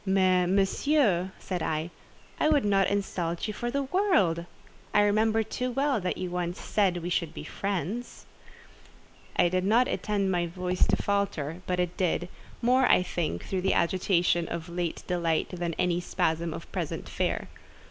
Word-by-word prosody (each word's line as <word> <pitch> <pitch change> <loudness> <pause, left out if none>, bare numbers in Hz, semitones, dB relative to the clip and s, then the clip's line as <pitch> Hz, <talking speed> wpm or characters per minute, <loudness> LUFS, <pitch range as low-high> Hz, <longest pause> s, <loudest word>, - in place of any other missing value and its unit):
"Mais, 185 -2 +3
Monsieur," 195 - +2
said 180 -3 -4
I, 160 +2 -2 0.5
"I 305 - +3
would 290 -7 +3
not 195 -2 +3
insult 180 -3 -2
you 215 - -3
for 240 +4 -3
the 280 +3 -1
world. 260 - +2 0.5
I 210 - +7
remember 215 +2 +3
too 250 +4 -3
well 270 -2 +1
that 180 - -2
you 180 -1 -4
once 180 0 -2
said 195 -4 +1
we 175 - -2
should 170 -3 -1
be - - -6
friends." 200 +7 -4 1.1
I - - +4
did 185 +1 0
not 230 +6 +4
intend 200 -3 0
my 175 -1 +1
voice 180 +1 0
to - - +3
falter, 190 -6 -1
but 180 0 0
it 180 0 -1
did: 180 -1 0 0.3
more, 255 +2 +4
I - - +5
think, 160 - -3
through 190 -1 -2
the 190 - +1
agitation 175 -1 +2
of 170 +1 -5
late 175 -1 -3
delight 170 -3 0
than 175 -2 -3
in - - -12
any 180 -1 +2
spasm 170 -2 -1
of - - -8
present - - -4
fear. - - -1
185 Hz, 170 wpm, -28 LUFS, 175-205 Hz, 1.1 s, I